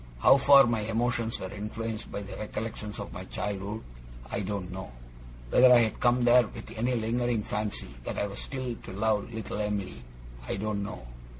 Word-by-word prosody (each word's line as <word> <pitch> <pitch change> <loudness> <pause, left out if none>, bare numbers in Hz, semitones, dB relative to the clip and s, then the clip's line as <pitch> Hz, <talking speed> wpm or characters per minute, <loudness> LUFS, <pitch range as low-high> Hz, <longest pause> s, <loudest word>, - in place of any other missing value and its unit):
How 60 - +7
far 140 0 +8
my 115 -2 +1
emotions 115 +1 -1
were 95 - -5
influenced 110 +2 -5
by 100 - -4
the 100 - -8
recollections 105 -1 -5
of - - -6
my - - -6
childhood, 105 +2 -4 0.5
I - - -1
don't 100 -2 -3
know. 95 -5 -7 0.6
Whether 125 0 +7
I 120 -1 +8
had 110 -2 0
come 120 0 +3
there 120 -1 +6
with - - -10
any 120 +3 0
lingering 115 0 0
fancy 105 -1 -3
that - - -4
I - - +1
was 100 - -6
still 130 -3 -4
to 95 - -10
love 105 +2 0
little 110 -2 -4
Em'ly, 100 -10 -3 0.5
I - - -1
don't 105 +1 -2
know. 100 - -6
110 Hz, 185 wpm, -29 LUFS, 100-120 Hz, 0.6 s, far